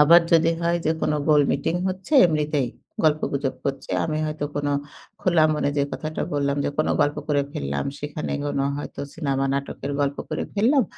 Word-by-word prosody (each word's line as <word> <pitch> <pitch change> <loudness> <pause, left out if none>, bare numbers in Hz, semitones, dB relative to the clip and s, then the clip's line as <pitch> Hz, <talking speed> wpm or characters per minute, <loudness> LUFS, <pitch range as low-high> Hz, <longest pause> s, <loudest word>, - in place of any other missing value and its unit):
আবার 165 +4 +8
যদি 165 0 +5
হয় 170 0 +1
যে 160 - +4
কোন - - +1 0.2
গোল 150 -1 +6
মিটিং 165 - 0
হচ্ছে, 185 +8 -6
এমনিতেই 150 -5 0 0.4
গল্পগুজব 145 -3 +1
করছে। 135 -1 -3
আমি 155 -1 -1
হয়তো 155 -1 -3
কোন 145 0 -1 0.5
খোলা 175 -4 +4
মনে 145 - 0
যে 140 - +3
কথাটা 155 0 -3
বললাম, 140 0 +1
যে - - 0
কোন 155 - +2
গল্প 145 0 +2
করে 145 -1 +2
ফেললাম, 70 - -2
সেখানে 150 +1 -4
কোনো 140 -1 0
হয়তো - - -6
সিনেমা 135 -4 -1
নাটকের 140 0 -3
গল্প 140 0 0
করে - - -2
ফেললাম। 255 +7 +4
150 Hz, 175 wpm, -24 LUFS, 140-160 Hz, 0.5 s, আবার